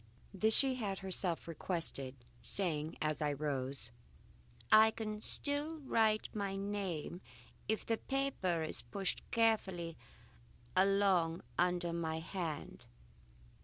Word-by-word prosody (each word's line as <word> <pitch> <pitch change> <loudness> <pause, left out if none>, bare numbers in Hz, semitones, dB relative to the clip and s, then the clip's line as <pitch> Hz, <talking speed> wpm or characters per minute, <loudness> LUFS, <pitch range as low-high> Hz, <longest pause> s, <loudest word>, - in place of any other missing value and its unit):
This 215 +3 +5
she 270 -1 +6
had 205 -6 -2
herself 185 -3 -1
requested, 160 -5 -3 0.3
saying 160 -5 0
as 155 0 -1
I 150 -1 +1
rose: 135 -4 -2 0.8
"I 220 +1 +9
can 215 -1 -5
still 290 +6 +2
write 220 -5 +2
my 200 -2 -2
name 195 -4 -3 0.5
if 220 - 0
the 225 - 0
paper 260 - -1
is 155 - -1
pushed 195 -2 -3
carefully 190 -8 +1 0.8
along 190 -3 +3
under 175 -1 +1
my 160 -1 -2
hand. 165 -1 -5
190 Hz, 110 wpm, -35 LUFS, 165-215 Hz, 0.8 s, I